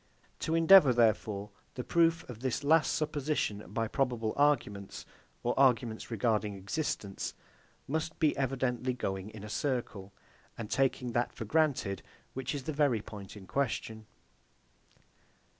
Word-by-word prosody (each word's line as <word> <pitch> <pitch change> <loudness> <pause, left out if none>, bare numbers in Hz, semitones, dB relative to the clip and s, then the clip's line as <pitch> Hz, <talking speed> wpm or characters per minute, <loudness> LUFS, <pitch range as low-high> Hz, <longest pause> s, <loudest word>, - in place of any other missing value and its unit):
To 160 - -1
endeavour, 165 -4 +8
therefore, 110 -3 +1 0.2
the 125 - -4
proof 165 +1 +2
of 120 -3 -8
this 130 +2 -2
last 155 +2 +4
supposition 145 - -2
by 115 +1 -1
probable 120 -4 -1
arguments, 120 -9 0 0.4
or 120 - +1
arguments 120 -4 +2
regarding 110 -2 0
existence, 100 0 -3 0.5
must 160 +2 -2
be 155 -2 +2
evidently 130 -1 -1
going 95 -4 -3
in 110 -2 -10
a - - -6
circle, 110 -6 -3 0.5
and 115 -2 -6
taking 130 -2 +1
that 120 +1 0
for 115 - -6
granted, 135 -8 +1 0.3
which 130 +2 -3
is 140 - -4
the 155 - -3
very 140 -7 +2
point 100 -2 -9
in 95 - -11
question. 110 0 -2
125 Hz, 135 wpm, -31 LUFS, 105-145 Hz, 0.5 s, endeavour